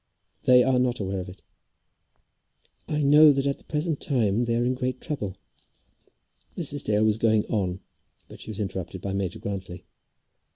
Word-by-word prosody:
"They 125 -1 +7
are 130 0 +2
not 125 -1 0
aware 95 -1 -3
of 90 +1 -6
it." 95 - -14 1.4
"I 150 -1 -1
know 150 +2 +7
that 135 -1 0
at 140 -1 -1
the - - -17
present 155 0 -2
moment 120 -3 +1
they 115 - +1
are 120 +1 +1
in 125 - +1
great 130 0 -3
trouble." 105 -11 -4 1.2
Mrs. 145 -4 0
Dale 105 0 +2
was 110 0 +1
going 110 -2 +2
on, 95 -4 -2 0.5
but - - -13
she - - -8
was 105 -1 -6
interrupted 95 -2 -4
by 95 +2 -4
Major 95 -2 -2
Grantly. 95 -2 -6
115 Hz, 170 wpm, -25 LUFS, 100-135 Hz, 1.4 s, They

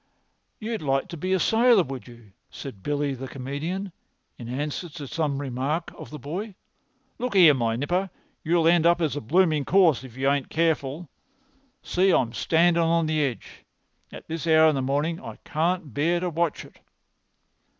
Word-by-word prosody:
"You'd 220 0 -4
like 135 -2 0
to - - -6
be 185 +4 -3
a 190 - +3
sailor, 225 0 +4
would 135 -4 -8
you?" 120 -4 -15 0.2
said 130 -9 -9
Billy 145 +3 -1
the 135 0 -7
comedian, 150 +10 -5 0.4
in 120 -1 -9
answer 145 +6 -4
to 150 -2 -8
some 150 -1 -1
remark 140 +4 -3
of - - -10
the 150 - -8
boy. 180 - -6 0.6
"Look 245 -3 -3
'ere, 170 -6 +8
my 115 -4 0
nipper, 175 +9 -1 0.3
you'll 165 0 +2
end 170 -1 +4
up 170 0 +4
as 155 -4 0
a 145 - -3
blooming 155 +3 +2
corpse 170 -6 +3
if 125 -2 -12
you 135 +1 0
ain't 140 -1 +1
careful. 160 -1 -1 0.8
See 190 +2 +2
'im 120 -10 +2
standin' 170 +3 +2
at 165 0 +2
the 155 -1 0
edge. 125 -8 -5 0.5
At - - -11
this 165 +1 -4
hour 160 0 +6
of - - +1
the 135 - -1
morning 145 +6 -1
I - - -8
can't 160 -3 -1
bear 165 +7 +1
to 180 0 -2
watch 165 -1 -1
it." - - -18
155 Hz, 180 wpm, -25 LUFS, 135-175 Hz, 0.8 s, ere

